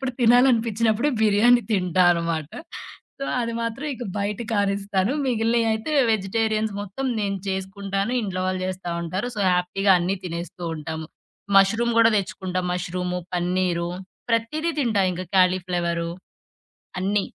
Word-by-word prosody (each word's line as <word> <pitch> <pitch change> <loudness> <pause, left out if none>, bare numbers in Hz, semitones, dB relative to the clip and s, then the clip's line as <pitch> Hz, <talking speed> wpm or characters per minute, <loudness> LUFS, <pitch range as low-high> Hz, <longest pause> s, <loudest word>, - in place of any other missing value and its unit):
అలాంటప్పుడు 265 -1 -2
తినాలనిపించినప్పుడు 235 0 +3
బిర్యానీ 220 +3 +5
తింటా 180 -2 +2
అనమాట. 165 -3 -1 0.7
సో, 275 - -3 0.2
అది 230 -1 -2
మాత్రం 230 +6 -3
ఇక 245 - -7
బయట 200 0 -2
కానిస్తాను. 200 +1 0
మిగిలినియయితే 230 +2 +1 0.2
వెజిటేరియన్స్ 215 +1 0
మొత్తం 205 +7 -4
నేను 200 -1 -1
చేసుకుంటాను. 195 +3 -2
ఇంట్లో 185 -2 -3
వాళ్ళు 185 0 -2
జేస్తా 185 -2 -4
ఉంటారు. 190 +9 -3
సో, - - -2
హ్యాపీగా 190 +2 +2
అన్నీ 185 +3 0
తినేస్తూ 170 +1 -6
ఉంటాము. 160 +1 -5 0.5
మష్రూమ్ 230 +4 +3
గూడా 225 0 +6
తెచ్చుకుంటా. 185 -1 -3
మష్రూము, 180 0 -3
పన్నీరు 175 -1 0 0.4
ప్రతీదీ 305 +9 0
తింటా 220 -6 +2
ఇంక 185 +1 -5
క్యాలీ 185 0 +4
ఫ్లవరు. 170 -1 -1 0.9
అన్ని. 200 +1 +1
195 Hz, 125 wpm, -24 LUFS, 180-225 Hz, 0.9 s, గూడా